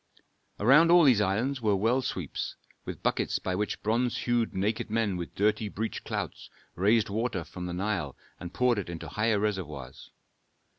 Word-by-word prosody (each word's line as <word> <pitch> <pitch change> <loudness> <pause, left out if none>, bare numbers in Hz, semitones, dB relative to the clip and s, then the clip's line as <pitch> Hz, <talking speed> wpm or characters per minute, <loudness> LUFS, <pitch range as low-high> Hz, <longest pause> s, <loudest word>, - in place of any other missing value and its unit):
Around 140 +10 +6
all 175 0 +7
these 125 -8 +5
islands 115 +8 0
were 105 -3 +2
well 115 +7 +2
sweeps, 90 - -4 0.3
with - - -7
buckets - - 0
by 95 - -3
which 105 +3 -2
bronze 120 +3 +1
hued 120 -2 +1
naked 105 +4 -1
men 110 -3 0
with 85 -2 -6
dirty 105 +1 +1
breech 110 +3 -4
clouts - - -5 0.2
raised 105 +4 +2
water 110 -4 -1
from 90 +2 -7
the 90 - -4
Nile 95 -7 -2 0.2
and 85 -1 -7
poured 125 +1 +2
it 95 - -5
into 85 -1 -6
higher 110 0 +1
reservoirs. 95 -9 -4
105 Hz, 165 wpm, -28 LUFS, 95-115 Hz, 0.3 s, all